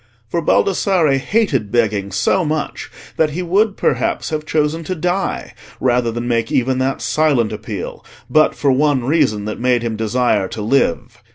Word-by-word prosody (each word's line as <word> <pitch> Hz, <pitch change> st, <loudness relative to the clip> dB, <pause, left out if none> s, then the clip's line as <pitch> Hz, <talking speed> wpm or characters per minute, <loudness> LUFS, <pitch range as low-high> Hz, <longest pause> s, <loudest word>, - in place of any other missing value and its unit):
For 170 Hz, -, -1 dB
Baldassarre 170 Hz, -4 st, +2 dB
hated 135 Hz, -, 0 dB
begging 105 Hz, -4 st, 0 dB
so 140 Hz, -, +1 dB
much 155 Hz, -1 st, -3 dB, 0.3 s
that 160 Hz, -, +3 dB
he 170 Hz, +5 st, -4 dB
would 200 Hz, +4 st, +1 dB
perhaps 125 Hz, +3 st, 0 dB
have 155 Hz, 0 st, -3 dB
chosen 155 Hz, +1 st, 0 dB
to 185 Hz, -, -3 dB
die 180 Hz, +4 st, -2 dB, 0.3 s
rather 120 Hz, -2 st, +1 dB
than 120 Hz, +1 st, -4 dB
make 115 Hz, -1 st, 0 dB
even 130 Hz, +1 st, +1 dB
that 135 Hz, +1 st, -1 dB
silent 145 Hz, -8 st, +1 dB
appeal, 105 Hz, -3 st, -6 dB, 0.2 s
but 155 Hz, 0 st, +3 dB
for 140 Hz, -, +1 dB
one 140 Hz, -1 st, +2 dB
reason 120 Hz, -7 st, +1 dB
that 105 Hz, -, -5 dB
made 125 Hz, -1 st, +1 dB
him 115 Hz, -2 st, -2 dB
desire 110 Hz, -2 st, +1 dB
to 110 Hz, -, -6 dB
live. 110 Hz, -7 st, 0 dB
130 Hz, 165 wpm, -18 LUFS, 115-155 Hz, 0.3 s, that